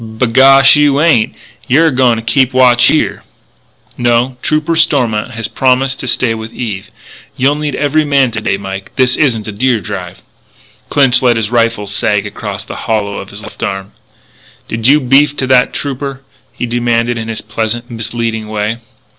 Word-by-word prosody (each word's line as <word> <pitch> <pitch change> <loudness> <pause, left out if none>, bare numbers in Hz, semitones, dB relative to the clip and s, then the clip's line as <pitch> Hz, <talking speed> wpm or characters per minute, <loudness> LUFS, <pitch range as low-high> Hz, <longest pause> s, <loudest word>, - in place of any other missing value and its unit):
"B'gosh, 130 +5 +5
you 145 -1 +3
ain't. 150 -9 +2 0.3
You're 155 +6 +3
a - - -3
goin' 125 -2 +2
to 115 - -5
keep 130 +2 +1
watch 125 -1 +4
here." 155 - +1 0.8
"No. 120 +1 +1
Trooper 155 +2 0
Stormont 125 -9 +1
has 115 0 -3
promised 130 +1 +1
to 130 - -5
stay 120 -1 +1
with 110 0 -7
Eve. 105 -6 -5 0.5
You'll 135 +3 +2
need 150 0 -3
every 150 +2 +1
man 140 -4 +2
to 110 - -4
day, 100 - -1
Mike. 95 0 -7
This 130 -1 +2
isn't 115 -8 0
a - - -4
deer 120 +3 0
drive." 95 - -7 0.7
Clinch 130 -3 +3
let 120 -3 +3
his 110 -1 -2
rifle 115 -3 +1
sag 100 0 -1
across 100 -1 -6
the - - -8
hollow 105 -2 -1
of 95 - -9
his 100 +2 -9
left - - -11
arm. 95 0 -4 0.8
"Did 115 +1 -2
you 145 +3 +5
beef 140 +2 +3
to 130 - -1
that 130 -1 +3
trooper?" 135 -1 -5 0.3
he - - -4
demanded 120 0 0
in 110 - -5
his 115 -1 -4
pleasant, 115 +2 -4
misleading 115 -1 -3
way. 110 +2 -3
120 Hz, 175 wpm, -13 LUFS, 110-135 Hz, 0.8 s, B'gosh